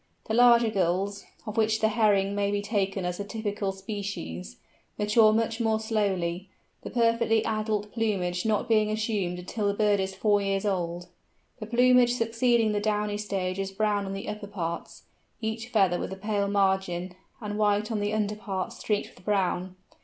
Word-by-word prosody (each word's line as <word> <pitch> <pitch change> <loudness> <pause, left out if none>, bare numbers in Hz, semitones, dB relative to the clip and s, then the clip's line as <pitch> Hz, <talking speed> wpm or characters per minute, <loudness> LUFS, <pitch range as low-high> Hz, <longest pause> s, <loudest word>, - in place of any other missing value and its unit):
The 220 - -3
larger 235 -1 +6
Gulls—of 200 +3 -2
which 220 0 +2
the 220 - +3
Herring 205 -3 +3
Gull - - -4
may 200 0 +1
be 205 0 -1
taken 195 -3 -1
as 180 +1 -3
a - - -2
typical 205 -1 -3
species—mature 200 - -1
much 225 +1 0
more 220 -1 +2
slowly, 195 -5 -1 0.3
the - - -7
perfectly 230 -2 +2
adult 215 -1 -1
plumage 190 -6 -1
not 215 -2 0
being 215 -2 +3
assumed 215 -5 -1
until 200 +4 -3
the 200 - 0
bird 205 -1 +2
is 190 0 -2
four 205 +1 +2
years 195 0 -1
old. 175 -3 -2 0.5
The 215 - -6
plumage 245 +1 +5
succeeding 230 -1 +2
the 205 - 0
downy 210 0 -1
stage 195 -3 -2
is 195 0 -2
brown 205 0 0
on 195 - -4
the 195 - -6
upper 210 -1 -5
parts, 170 -4 -5 0.4
each 225 0 -3
feather 195 -7 +2
with - - -4
a 190 - -6
pale 205 0 -1
margin, 190 -3 0 0.3
and 210 -1 -4
white 210 +1 +2
on 220 - -1
the 205 0 -1
under 210 -1 0
parts 210 +1 -4
streaked 210 -2 -2
with 180 - -18
brown. 185 -2 0
205 Hz, 175 wpm, -27 LUFS, 195-220 Hz, 0.5 s, larger